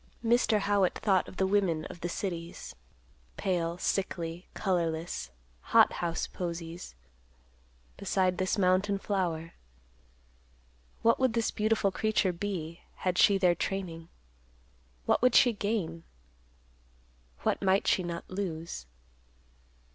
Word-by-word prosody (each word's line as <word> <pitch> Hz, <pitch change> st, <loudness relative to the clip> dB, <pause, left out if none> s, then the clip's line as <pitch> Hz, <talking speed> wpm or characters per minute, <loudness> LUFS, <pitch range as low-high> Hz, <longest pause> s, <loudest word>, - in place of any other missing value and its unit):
Mr. 225 Hz, -2 st, +3 dB
Howitt 200 Hz, -2 st, +2 dB
thought 195 Hz, -4 st, +2 dB
of 185 Hz, -, -11 dB
the 190 Hz, -, +2 dB
women 190 Hz, -5 st, +1 dB
of 170 Hz, -, -9 dB
the 175 Hz, -, -2 dB
cities, 170 Hz, -2 st, -5 dB, 0.6 s
pale, 170 Hz, -2 st, -1 dB
sickly, 175 Hz, -2 st, -2 dB
colorless, 170 Hz, -4 st, -1 dB, 0.3 s
hot -, -, +5 dB
house 170 Hz, -1 st, -2 dB
posies, 170 Hz, -, -6 dB, 1.0 s
beside 185 Hz, -1 st, +1 dB
this 185 Hz, +2 st, 0 dB
mountain 190 Hz, +1 st, +2 dB
flower. 175 Hz, -5 st, -2 dB, 1.5 s
What 230 Hz, -, +4 dB
would 260 Hz, -3 st, +2 dB
this 230 Hz, -1 st, +1 dB
beautiful 215 Hz, -2 st, +1 dB
creature 210 Hz, -2 st, +1 dB
be, 170 Hz, -3 st, -4 dB
had 180 Hz, -1 st, -1 dB
she 200 Hz, -2 st, +6 dB
their 180 Hz, -2 st, +4 dB
training? 170 Hz, -2 st, -4 dB, 1.0 s
What -, -, +2 dB
would 250 Hz, 0 st, +4 dB
she 245 Hz, -3 st, +6 dB
gain? 200 Hz, -6 st, -2 dB, 1.4 s
What -, -, +1 dB
might 195 Hz, 0 st, +3 dB
she -, -, +3 dB
not 170 Hz, -1 st, -5 dB
lose? 170 Hz, -, -5 dB
185 Hz, 115 wpm, -30 LUFS, 170-200 Hz, 1.5 s, she